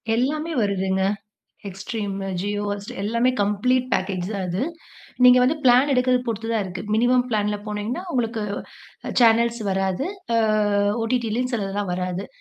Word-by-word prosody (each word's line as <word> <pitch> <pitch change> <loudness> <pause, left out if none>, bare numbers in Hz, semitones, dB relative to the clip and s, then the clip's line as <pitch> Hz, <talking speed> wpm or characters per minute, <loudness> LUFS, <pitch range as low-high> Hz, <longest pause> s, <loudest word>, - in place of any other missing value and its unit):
எல்லாமே 305 +7 -1
வருதுங்க 190 -1 0 0.7
Extremeமு 195 0 -4
Jio 205 +1 -2
Hotstar 205 0 -6
எல்லாமே 235 +4 +2
ம் - - -6
கம்ப்ளீட் 250 +5 +1
பேக்கேஜ் 185 -2 -1
தான் 195 -2 -3
அது. 180 +7 -1 0.6
நீங்க 250 0 +8
வந்து 280 +5 +2
பிளான் 255 +3 +5
எடுக்குறத 250 -1 +3
பொறுத்து 225 0 -3
தான் 225 -3 +1
இருக்கு. 180 -1 -6
மினிமம் 245 +2 +3
பிளான் 210 -1 +1 0.2
போனீங்கன்னா 210 - -3
உங்களுக்கு 230 -3 -1 0.8
சேனல்ஸ் 235 0 +4
வராது. 190 - -1 0.3
ஆ - - +4 0.7
ஓடிடிலயும் 240 +1 -1
சிலதெல்லாம் 200 -3 -2
வராது. 180 +1 -3
220 Hz, 135 wpm, -23 LUFS, 195-250 Hz, 0.8 s, நீங்க